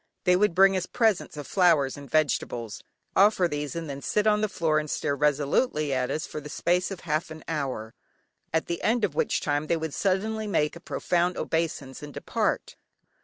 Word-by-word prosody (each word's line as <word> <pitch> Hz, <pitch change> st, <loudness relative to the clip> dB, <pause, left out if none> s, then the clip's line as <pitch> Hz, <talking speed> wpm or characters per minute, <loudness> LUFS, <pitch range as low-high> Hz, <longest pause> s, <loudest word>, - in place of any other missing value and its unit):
They 180 Hz, -1 st, +4 dB
would 195 Hz, -2 st, +2 dB
bring 195 Hz, +1 st, +6 dB
us 185 Hz, -1 st, -1 dB
presents 220 Hz, -9 st, +1 dB
of 145 Hz, -, -5 dB
flowers 165 Hz, -8 st, +3 dB
and 140 Hz, -2 st, -11 dB
vegetables, 120 Hz, -7 st, 0 dB, 0.3 s
offer 195 Hz, -2 st, +5 dB
these, 150 Hz, -2 st, -4 dB
and 165 Hz, -1 st, -4 dB
then 140 Hz, -1 st, -6 dB
sit 210 Hz, +8 st, 0 dB
on 210 Hz, -1 st, +3 dB
the 215 Hz, -, +1 dB
floor 160 Hz, -4 st, +1 dB
and 150 Hz, 0 st, -5 dB
stare 140 Hz, 0 st, -1 dB
resolutely 150 Hz, -, +1 dB
at 125 Hz, -1 st, 0 dB
us 155 Hz, -, -2 dB
for 150 Hz, -, -6 dB
the 150 Hz, -, -9 dB
space 175 Hz, +4 st, +1 dB
of 195 Hz, -3 st, -7 dB
half 160 Hz, +2 st, -1 dB
an 160 Hz, -1 st, -9 dB
hour, 135 Hz, -8 st, -3 dB, 0.6 s
at 160 Hz, 0 st, +1 dB
the 170 Hz, -, -3 dB
end 230 Hz, +1 st, +1 dB
of 195 Hz, -8 st, +1 dB
which -, -, 0 dB
time 145 Hz, +1 st, -1 dB
they 170 Hz, -, +2 dB
would 160 Hz, -2 st, -4 dB
suddenly 215 Hz, +3 st, 0 dB
make 150 Hz, -7 st, +1 dB
a -, -, -9 dB
profound 175 Hz, +1 st, 0 dB
obeisance 155 Hz, -5 st, -2 dB
and 150 Hz, -1 st, -9 dB
depart. -, -, -1 dB
160 Hz, 200 wpm, -27 LUFS, 145-185 Hz, 0.6 s, bring